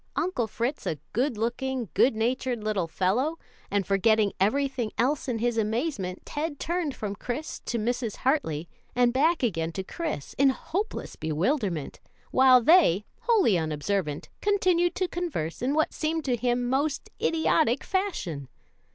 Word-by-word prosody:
Uncle 340 Hz, -11 st, 0 dB
Fritz 235 Hz, +6 st, -3 dB
a 155 Hz, -, -1 dB, 0.2 s
good 250 Hz, 0 st, 0 dB
looking, 240 Hz, +1 st, -2 dB
good 250 Hz, -, +4 dB
natured 240 Hz, 0 st, -1 dB
little 205 Hz, -5 st, 0 dB
fellow; 235 Hz, -, 0 dB, 0.3 s
and 200 Hz, -1 st, 0 dB
forgetting 205 Hz, +1 st, +3 dB
everything 250 Hz, +2 st, +1 dB
else 275 Hz, +4 st, +1 dB
in 245 Hz, -3 st, -1 dB
his 235 Hz, 0 st, 0 dB
amazement, 220 Hz, -, -2 dB
Ted 295 Hz, -1 st, -3 dB
turned 335 Hz, -4 st, -1 dB
from 205 Hz, -2 st, -4 dB
Chris 250 Hz, +9 st, -5 dB
to 235 Hz, -, -3 dB
Mrs. 230 Hz, 0 st, -1 dB
Hartley, 175 Hz, -, 0 dB, 0.3 s
and 245 Hz, -1 st, +3 dB
back 315 Hz, +4 st, +2 dB
again 165 Hz, -8 st, 0 dB
to 190 Hz, -, -3 dB
Chris, 185 Hz, -, -4 dB
in 275 Hz, 0 st, +6 dB
hopeless 385 Hz, +10 st, -3 dB
bewilderment, 170 Hz, -, -1 dB, 0.3 s
while 260 Hz, -1 st, +6 dB
they, 225 Hz, -, +5 dB
wholly 390 Hz, -, +3 dB
unobservant, 155 Hz, 0 st, -2 dB
continued 365 Hz, -4 st, +2 dB
to 370 Hz, -, 0 dB
converse 325 Hz, -, -3 dB
in 265 Hz, +4 st, +1 dB
what 315 Hz, -, +1 dB
seemed 320 Hz, 0 st, -1 dB
to 255 Hz, -3 st, +2 dB
him 245 Hz, +1 st, 0 dB
most 280 Hz, +3 st, -1 dB
idiotic 320 Hz, -5 st, +2 dB
fashion. 265 Hz, -, -2 dB
245 Hz, 145 wpm, -27 LUFS, 200-305 Hz, 0.3 s, in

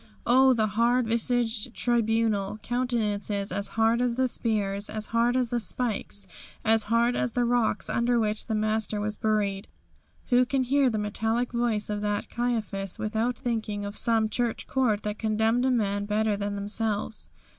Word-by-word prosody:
Oh, 260 Hz, +2 st, +6 dB
the 220 Hz, -3 st, +2 dB
hard 235 Hz, +4 st, +2 dB
visaged 230 Hz, 0 st, 0 dB
tribunal; 225 Hz, -4 st, +1 dB
countenances 215 Hz, -5 st, -1 dB
as 200 Hz, 0 st, -2 dB
hard 225 Hz, +2 st, +3 dB
as 245 Hz, -1 st, +1 dB
the 260 Hz, +1 st, +2 dB
spears, 205 Hz, -4 st, -1 dB
as 215 Hz, 0 st, -4 dB
hard 235 Hz, +2 st, +3 dB
as 250 Hz, -2 st, 0 dB
the 240 Hz, -, +1 dB
spikes, 215 Hz, -3 st, -3 dB, 0.4 s
as 225 Hz, 0 st, +3 dB
hard 235 Hz, +2 st, +2 dB
as 235 Hz, -, -1 dB
the 245 Hz, -1 st, +1 dB
rocks 240 Hz, -2 st, +1 dB
under 235 Hz, +1 st, +1 dB
which 215 Hz, -1 st, -1 dB
the 220 Hz, -, -1 dB
Master 215 Hz, 0 st, 0 dB
was 210 Hz, +1 st, -2 dB
buried! 205 Hz, -3 st, -1 dB, 0.6 s
Who 250 Hz, -1 st, +5 dB
can 260 Hz, +1 st, 0 dB
hear 270 Hz, +1 st, +3 dB
the 220 Hz, -, -2 dB
metallic 225 Hz, +3 st, -1 dB
voice 235 Hz, -3 st, 0 dB
of 210 Hz, -1 st, -3 dB
that 205 Hz, 0 st, -2 dB
Caiaphas 220 Hz, -6 st, -2 dB
without 225 Hz, +3 st, -1 dB
thinking 215 Hz, -4 st, -3 dB
of 200 Hz, +1 st, -6 dB
some 225 Hz, -1 st, +2 dB
church 235 Hz, +1 st, -2 dB
court 230 Hz, -6 st, 0 dB
that 210 Hz, 0 st, -4 dB
condemned 220 Hz, +3 st, +1 dB
a -, -, +3 dB
man 205 Hz, -4 st, 0 dB
better 210 Hz, 0 st, +1 dB
than 200 Hz, 0 st, -3 dB
themselves? 210 Hz, +1 st, -2 dB
225 Hz, 165 wpm, -27 LUFS, 210-240 Hz, 0.6 s, Oh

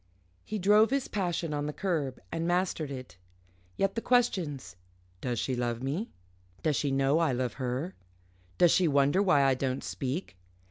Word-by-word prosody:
He 215 Hz, -, -4 dB
drove 210 Hz, +3 st, +5 dB
his 275 Hz, 0 st, 0 dB
passion 175 Hz, -5 st, -2 dB
on 145 Hz, 0 st, -2 dB
the -, -, -2 dB
curb, 150 Hz, -9 st, -2 dB
and 165 Hz, 0 st, -2 dB
mastered 175 Hz, -4 st, 0 dB
it. 130 Hz, -7 st, -8 dB, 0.6 s
Yet 195 Hz, 0 st, +1 dB
the 230 Hz, -, -2 dB
questions 185 Hz, -, 0 dB, 0.5 s
Does 120 Hz, -2 st, -2 dB
she 130 Hz, -, -1 dB
love 120 Hz, 0 st, -2 dB
me? 155 Hz, -, -2 dB, 0.5 s
Does 155 Hz, -2 st, +2 dB
she 145 Hz, -, 0 dB
know 135 Hz, +3 st, +2 dB
I 160 Hz, -5 st, +2 dB
love 125 Hz, -2 st, -1 dB
her? 130 Hz, +9 st, -2 dB, 0.6 s
Does 175 Hz, -, +6 dB
she 185 Hz, -3 st, +4 dB
wonder 145 Hz, +5 st, +3 dB
why 180 Hz, -8 st, +4 dB
I 135 Hz, -1 st, +4 dB
don't 130 Hz, 0 st, -2 dB
speak? 135 Hz, -, -4 dB
150 Hz, 170 wpm, -29 LUFS, 135-185 Hz, 0.6 s, Does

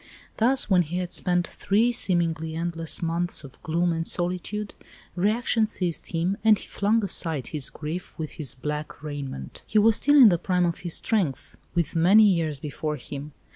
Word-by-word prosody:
Thus 255 Hz, +4 st, +2 dB
when 185 Hz, -3 st, +4 dB
he 170 Hz, +1 st, -3 dB
had 180 Hz, -1 st, -3 dB
spent 175 Hz, -1 st, +1 dB
three 220 Hz, +8 st, +1 dB
seemingly 165 Hz, -7 st, 0 dB
endless 165 Hz, 0 st, -2 dB
months 170 Hz, +1 st, +1 dB
of 135 Hz, -2 st, -13 dB
gloom 170 Hz, +2 st, 0 dB
and 165 Hz, 0 st, -2 dB
solitude, 185 Hz, +4 st, -2 dB, 0.4 s
reaction 220 Hz, +4 st, +1 dB
seized 180 Hz, -6 st, -3 dB
him, 175 Hz, +4 st, -1 dB
and 220 Hz, -1 st, +6 dB
he -, -, -10 dB
flung 215 Hz, +2 st, +1 dB
aside 160 Hz, -8 st, -1 dB
his 150 Hz, -4 st, -4 dB
grief 160 Hz, +4 st, -6 dB
with 155 Hz, -2 st, -5 dB
his 150 Hz, -5 st, -3 dB
black 150 Hz, +3 st, -5 dB
raiment. 140 Hz, -, -6 dB
He 215 Hz, -, 0 dB
was 220 Hz, +1 st, +5 dB
still 290 Hz, +1 st, +3 dB
in 260 Hz, -6 st, +9 dB
the 175 Hz, -3 st, +1 dB
prime 180 Hz, 0 st, +1 dB
of 170 Hz, -1 st, -2 dB
his 175 Hz, -2 st, -3 dB
strength, 190 Hz, -, -1 dB, 0.2 s
with 170 Hz, -3 st, 0 dB
many 185 Hz, +7 st, +6 dB
years 165 Hz, -7 st, +2 dB
before 150 Hz, +2 st, -4 dB
him. 145 Hz, +2 st, -8 dB
175 Hz, 175 wpm, -25 LUFS, 155-200 Hz, 0.4 s, in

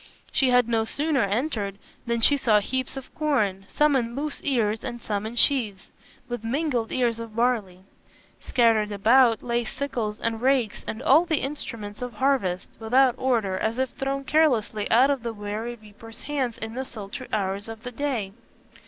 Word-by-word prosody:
She 265 Hz, -, +2 dB
had 250 Hz, -2 st, +4 dB
no 225 Hz, -1 st, +1 dB
sooner 285 Hz, +4 st, 0 dB
entered 205 Hz, -2 st, -1 dB, 0.3 s
than 235 Hz, 0 st, 0 dB
she 285 Hz, -, +6 dB
saw 225 Hz, -6 st, +3 dB
heaps 260 Hz, +5 st, -3 dB
of 265 Hz, -, -9 dB
corn, 210 Hz, -11 st, 0 dB
some 300 Hz, -1 st, +3 dB
in 235 Hz, -2 st, -1 dB
loose 290 Hz, +1 st, -3 dB
ears 225 Hz, -6 st, 0 dB
and 240 Hz, -1 st, -5 dB
some 210 Hz, -2 st, -3 dB
in 230 Hz, -, -7 dB
sheaves, 230 Hz, -7 st, +2 dB, 0.4 s
with 240 Hz, -2 st, -5 dB
mingled 245 Hz, -1 st, -1 dB
ears 235 Hz, -3 st, 0 dB
of 230 Hz, -2 st, -8 dB
barley. 225 Hz, -7 st, 0 dB, 0.6 s
Scattered 225 Hz, -4 st, +2 dB
about, 225 Hz, +3 st, +4 dB
lay 240 Hz, 0 st, 0 dB
sickles 225 Hz, -4 st, -3 dB
and 225 Hz, -1 st, -2 dB
rakes, 255 Hz, -5 st, +1 dB
and 225 Hz, +4 st, -5 dB
all 310 Hz, +6 st, +5 dB
the 320 Hz, -3 st, 0 dB
instruments 230 Hz, -7 st, -6 dB
of 245 Hz, -1 st, -4 dB
harvest, 210 Hz, -7 st, 0 dB
without 250 Hz, +3 st, +4 dB
order, 225 Hz, -8 st, +1 dB
as 220 Hz, +2 st, -1 dB
if 260 Hz, -1 st, 0 dB
thrown 275 Hz, 0 st, -3 dB
carelessly 245 Hz, -9 st, +1 dB
out 255 Hz, +5 st, +5 dB
of 275 Hz, -3 st, -1 dB
the 230 Hz, -1 st, -4 dB
weary 210 Hz, +3 st, -5 dB
reapers' 220 Hz, +1 st, -13 dB
hands 265 Hz, -5 st, -2 dB
in 220 Hz, 0 st, -6 dB
the 260 Hz, +2 st, -3 dB
sultry 225 Hz, +1 st, -8 dB
hours 200 Hz, 0 st, -2 dB
of 225 Hz, 0 st, -9 dB
the 250 Hz, -, -5 dB
day. 245 Hz, -7 st, -2 dB
235 Hz, 175 wpm, -25 LUFS, 215-265 Hz, 0.6 s, she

